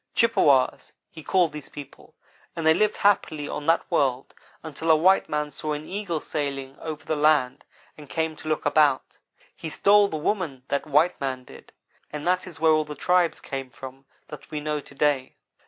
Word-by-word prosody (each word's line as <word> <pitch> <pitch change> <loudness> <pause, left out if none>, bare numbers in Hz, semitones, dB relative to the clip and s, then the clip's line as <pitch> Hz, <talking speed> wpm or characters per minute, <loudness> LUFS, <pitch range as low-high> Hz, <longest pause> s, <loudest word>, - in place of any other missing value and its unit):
Chippewas, 145 - +2 0.2
he 160 - -10
called 175 0 +2
these 150 -2 -9
people, 145 -2 -12 0.4
and 165 - -4
they 160 - +6
lived 215 +5 +1
happily 160 -7 +1
on 145 - -5
that 165 - +3
world 135 -5 0 0.3
until 160 +1 -5
a 160 - +7
white 185 +5 +3
man 150 0 -2
saw 150 +2 -3
an 150 +1 -6
Eagle 190 -5 -3
sailing 140 -3 -4
over 155 -2 -7
the 155 - -1
land 150 -4 +2 0.4
and 145 -2 -12
came 160 -1 -2
to - - -10
look 155 -1 -1
about. 145 -2 +2 0.4
He 160 - -6
stole 200 +6 +4
the 160 - -4
woman 150 -6 -2
that 140 +2 -1
white 155 +4 +2
man 130 -2 -3
did; - - -15 0.4
and 150 -1 -6
that 180 +1 +1
is 175 - -10
where 160 0 +4
all 155 0 +3
the 150 0 -8
tribes 180 +3 +1
came 135 -1 -6
from 135 +2 -11 0.2
that 150 - -11
we 150 - -4
know 150 0 -2
to 145 - -14
day. 140 -2 0
150 Hz, 190 wpm, -25 LUFS, 140-165 Hz, 0.4 s, a